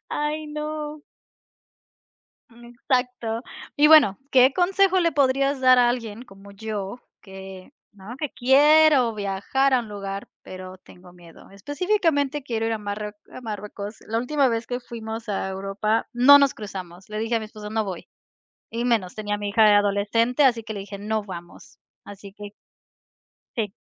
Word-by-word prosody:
Ay, 300 +1 -2
no. 300 0 -5 1.5
Mm, 240 +1 -17
exacto, 245 -3 -2 0.3
y 295 +1 +5
bueno, 295 -11 +6
¿qué 260 0 +5
consejo 375 +2 +2
le 335 -1 +2
podrías 275 0 +1
dar 255 -1 +6
a 245 -1 +5
alguien 230 -2 -4
como 195 -3 -15
yo?, 210 +1 -6 0.2
que, 190 +2 -11 0.2
¿no?, 205 +4 -10
que 300 -2 -3
quiero 275 -1 +5
viajar 205 +7 0
a 255 - +4
un 230 - -9
lugar, 200 -1 -6
pero 185 0 -9
tengo 180 -1 -17
miedo. 170 -2 -16
Específicamente, 290 - -1
quiero 225 -4 -2
ir 225 - -1
a - - -4
marrue 210 0 -5 0.2
a - - -9
Marruecos. 210 -2 -7
La 225 +1 -1
última 270 +2 +1
vez 230 0 -2
que 245 - -3
fuimos 225 -1 -7
a 195 -1 -2
Europa 195 +3 -2
no 255 +4 +8
nos 280 -2 +3
cruzamos. 190 -3 -9
Le 215 - -5
dije 225 +2 -1
a - - +2
mi 220 - -7
esposo: 210 -1 -10
"No 220 0 0
voy". 185 -3 -7 0.6
Y 235 +1 -3
menos, 220 -7 0
tenía 210 -1 -3
a - - -3
mi 205 0 -4
hija 210 0 +5
adolescente, 210 +6 +1
así 235 -4 +3
que 215 0 -7
le 200 - -5
dije: 200 +1 -8
"No 215 +1 -2
vamos". 175 -3 -11 0.2
Así 200 -1 -11
que 205 0 -10 1.0
Sí. 220 -3 -1
225 Hz, 165 wpm, -24 LUFS, 205-265 Hz, 1.5 s, no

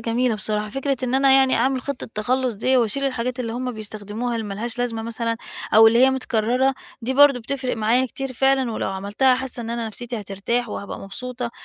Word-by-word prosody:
جميلة 230 +1 +1
بصراحة. 210 +1 -2
فكرة 270 +4 -1
إن 250 0 -1
أنا 270 0 +5
يعني 265 -1 +5
أعمل 260 +2 +1
خطة 280 -5 -5
تخلُّص 250 +3 0
دي 255 +6 +1
وأشيل 250 +3 +1
الحاجات 255 -1 -2
اللي 230 -2 -3
هم 250 +1 -3
بيستخدموها 215 +2 -5
اللي 220 -2 -3
مالهاش 225 +4 -4
لازمة 235 -2 -1
مثلًا 230 0 -2 0.4
أو 225 +1 +9
اللي 230 +1 +5
هي 260 +1 +6
متكرّرة 255 +1 +1 0.3
دي 255 +3 -2
برضه 280 -2 +6
بتفرق 255 +1 -3
معايا 230 +4 +2
كتير 270 +1 -6
فعلًا 265 -2 +2
ولو - - -2
عملتها 205 +7 +2
حاسّة 255 -1 -2
إن 230 0 -5
أنا 235 -1 -2
نَفْسيتي 235 +1 -5
هترتاح 205 +5 -2
وهابقى 200 -1 -6
مبسوطة، 245 +4 -5
240 Hz, 195 wpm, -22 LUFS, 220-260 Hz, 0.4 s, أو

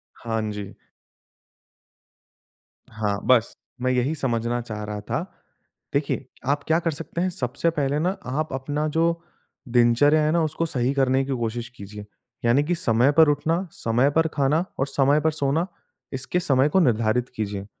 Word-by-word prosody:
हाँ 115 -1 -3
जी। 105 -1 -7 2.2
हाँ, 105 -2 -1
बस। 120 -3 +3 0.3
मैं 130 - +1
यही 130 +4 +1
समझना 120 -3 -1
चाह 110 -3 -6
रहा 105 0 -5
था। 105 - -2 0.7
देखिए 140 -1 -1 0.2
आप 145 +1 +1
क्या 160 +1 +3
कर 165 -1 -1
सकते 165 +3 -5
हैं 185 - +1
सबसे 170 -1 -1
पहले 145 -2 0
ना 185 +5 0
आप 150 +4 -2
अपना 145 +3 -2
जो 165 +2 +1 0.5
दिनचर्या 125 +6 +4
है 150 - +2
ना, 170 - +2
उसको 155 +2 -1
सही 130 -4 0
करने 135 -1 +2
की 135 - -4
कोशिश 120 0 -3
कीजिए। 105 +1 -9 0.4
यानि 120 +5 +4
की 175 +4 0
समय 125 -5 +3
पर 160 +1 +6
उठना, 165 +5 0
समय 120 +4 +1
पर 160 0 +4
खाना 150 +4 +2
और 135 - +1
समय 140 +2 +3
पर 160 +1 +2
सोना 155 +3 0 0.5
इसके 135 +7 -1
समय 135 -4 +3
को 190 - +3
निर्धारित 120 -4 +2
कीजिए। 100 -2 -3
135 Hz, 160 wpm, -24 LUFS, 120-155 Hz, 2.2 s, पर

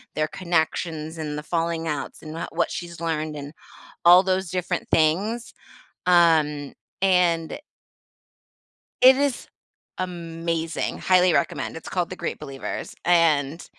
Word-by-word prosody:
their 155 0 +1
connections 160 -2 -2
and 150 -2 -4
the 150 - -5
falling 165 0 -2
outs, 145 -3 -4
and 155 -1 -8
wha 165 - -4
what - - 0
she's 170 -1 -6
learned 155 -2 -2
and 145 +1 -8 0.5
all 175 +2 +8
those 190 -1 0
different 180 0 -2
things, 195 +9 +1 0.5
um, 160 -5 +3 0.3
and 180 - +2 1.4
It 260 +1 +9
is 280 -3 -1 0.5
amazing, 165 -2 -3
highly 185 -1 +4
recommend, - - -1
it's 165 - -9
called 180 -2 -1
The 185 - -6
Great - - -4
Believers, 135 -1 -6
and 165 -3 +2
165 Hz, 125 wpm, -24 LUFS, 155-180 Hz, 1.4 s, It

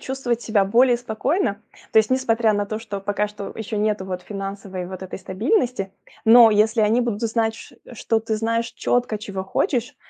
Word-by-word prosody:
чувствовать 255 -3 -2
себя 210 -3 +2
более 240 +5 +4
спокойно. 235 - -1 0.3
То 220 - +6
есть 220 +2 +3
несмотря 235 -4 +2
на 205 0 -1
то, 215 +1 -4
что 205 -3 -6
пока 205 +1 -1
что 205 -1 -8
еще 220 0 -4
нету 210 -2 0
вот 185 -1 -5
финансовой 195 -2 -6
вот 185 0 -8
этой 190 - -7
стабильности, 215 - -1 0.3
но 230 0 +8
если 220 +2 +3
они 215 +3 +3
будут 235 -3 -2
знать, 225 0 0
ч - - -13 0.2
что 225 -1 0
ты 220 -1 -2
знаешь 230 +1 0
четко, 245 -3 0
чего 195 -2 -6
хочешь, 245 +6 -1
220 Hz, 185 wpm, -22 LUFS, 200-235 Hz, 0.3 s, но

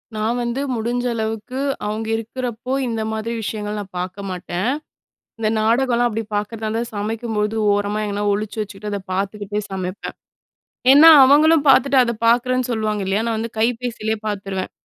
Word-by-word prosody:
நான் 215 +2 0
வந்து 240 +3 -2
முடிஞ்ச 240 +2 -2
அளவுக்கு 220 +3 -4 0.3
அவுங்க 215 +1 -3
இருக்குறப்போ, 240 +2 -4
இந்த 225 -1 -2
மாதிரி 220 +1 -3
விஷயங்கள் 210 -1 -4
நான் 195 -2 -9
பாக்க 180 +1 -5
மாட்டேன். 180 +2 -3 0.7
இந்த 215 -1 +1
நாடகலாம் 240 +2 +2
அப்டி 225 0 -3
பாக்கறதா 215 +2 -3
இருந்தா, 225 +2 -1
சமைக்கும்பொழுது 215 0 -2 0.2
ஓரமா 205 +1 -1
எங்கனா 205 0 -2
ஒழிச்சு 210 +2 -3
வச்சுக்கிட்டு 210 0 -6
அதை 200 - -2
பாத்துக்கிட்டே 205 +2 -2
சமைப்பேன். 185 0 -5 0.8
ஏன்னா, 300 +4 +9 0.2
அவங்களும் 305 +3 +5
பாத்துட்டு, 270 +1 +5
அத 235 -1 -1
பாக்குறேன்னு 250 +2 +2
சொல்லுவாங்க 215 -3 -1
இல்லையா? 200 +3 +1
நான் 225 -1 -1
வந்து 230 +1 -4
கைபேசிலயே 230 -1 -1
பாத்துருவேன். 195 -2 -4
220 Hz, 145 wpm, -20 LUFS, 205-235 Hz, 0.8 s, ஏன்னா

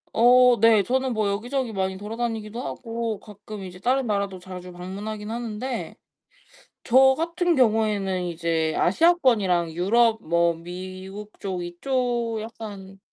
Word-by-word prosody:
어 245 +1 +6
네. 225 -2 +5
저는 260 +4 0
뭐 215 -2 0
여기저기 240 +5 -2
많이 190 -2 -2
돌아다니기도 225 +1 -4
하고 230 -3 -4
가끔 210 -1 -10
이제 180 -1 -9
다른 255 +4 +1
나라도 200 -3 -1
자주 180 0 -9
방문하긴 205 +4 -6
하는데 235 +2 -4 0.9
저 265 +2 +6
같은 340 +2 0
경우에는 215 - +2
이제 165 -2 -1
아시아권이랑 210 - +3
유럽 225 +6 +3
뭐 170 -2 +2
미국 185 +4 -9
쪽 185 -3 -4
이쪽 235 +5 -1
약간 205 -4 -9
215 Hz, 285 characters per minute, -24 LUFS, 185-240 Hz, 0.9 s, 어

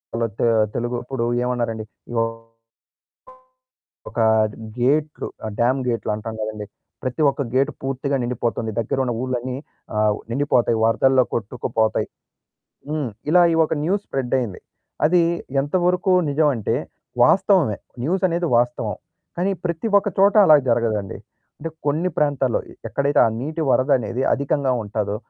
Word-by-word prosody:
ఆళ్ళ 115 - 0
తె - - +2 0.3
తెలుగు 120 +1 -2
ఇప్పుడు 125 -2 -3 0.2
ఏమన్నారండి. 115 -3 -2 2.2
ఒక - - -10 0.3
డ్ - - -13 0.2
గేటులు 150 +5 0 0.3
డ్యామ్ 130 +3 +3
గేటులు 115 -2 -1
అంటాం 110 +1 -6
గదండీ. 105 -1 -4 0.4
ప్రతి 130 +5 -2
ఒక్క 140 - -4
గేట్ 135 +1 +3
పూర్తిగా 135 +1 -1
నిండిపోతుంది. 120 -2 -2
దగ్గరున్న 125 +2 0
ఊర్లన్నీ 130 0 -3 0.4
ఆ - - -1 0.3
నిండిపోతాయి. 120 -3 +2
వరదల్లో 130 +3 +4
కొట్టుకుపోతాయి. 110 0 -1 0.8
హ్మ్. 150 -6 -2 0.2
ఇలా 180 +1 +6
ఈ - - +1
ఒక 155 - -1
న్యూస్ 195 +4 0
స్ప్రెడ్ 135 -1 -2
అయ్యింది. 110 -7 -4 0.5
అది 175 +1 +4 0.4
ఎంతవరకు 180 +5 +1 0.2
నిజమంటే 140 -7 +1 0.5
వాస్తవమే. - - +3 0.2
న్యూస్ 180 +7 0
అనేది 170 0 -1
వాస్తవం. 120 0 -1 0.4
కానీ 185 +3 +1
ప్రతి 170 +4 -2
ఒక్క 205 - -2
చోట 200 +2 +5
అలా 155 - +8
జరగదండి. 110 -4 0 0.4
అంటే 165 - -4 0.2
కొన్ని 160 +5 +1
ప్రాంతాల్లో 140 -5 +1 0.3
ఎక్కడైతే 140 +1 +1
ఆ - - +3
నీటి 155 +4 -3
వరదనేది 130 -2 +1
అధికంగా 140 -1 +1
ఉంటాదో 105 0 -2
130 Hz, 125 wpm, -22 LUFS, 115-150 Hz, 2.2 s, అలా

